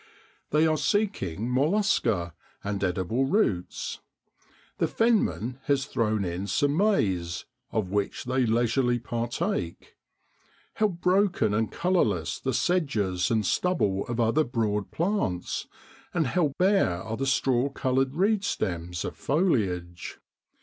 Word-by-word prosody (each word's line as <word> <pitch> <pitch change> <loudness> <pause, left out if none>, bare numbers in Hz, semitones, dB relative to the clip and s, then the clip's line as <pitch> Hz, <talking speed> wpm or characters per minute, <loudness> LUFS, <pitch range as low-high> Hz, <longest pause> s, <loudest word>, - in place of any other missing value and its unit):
They 155 +2 +3
are 155 -1 +2
seeking 140 - 0
mollusca 125 - +1 0.3
and 100 -1 -2
edible 95 +8 0
roots. 135 - 0 0.8
The - - +2
fenman 200 - +1
has 140 -1 +1
thrown 110 -7 0
in 90 +3 -3
some 145 +5 +1
maize, 95 - +1 0.2
of 100 -5 -2
which 100 0 -1
they 130 0 +1
leisurely 120 +2 +2
par 120 0 -3
take. 135 - -3 0.8
How 215 - +2
broken 180 - +1
and 110 +1 0
colourless 105 - 0
the 130 - -1
sedges 110 - 0
and 110 -3 +1
stubble 100 - +1
of 120 0 -3
other 115 +7 +3
broad 110 -5 -1
plants, 170 - -1 0.5
and 165 -3 +2
how 150 0 +1
bare 185 - +3
are 110 0 -4
the 135 +3 -2
straw 135 -1 +2
coloured 135 0 0
reedstems 105 - -1
of - - -5
foliage! 100 - -1
120 Hz, 120 wpm, -27 LUFS, 100-165 Hz, 0.8 s, They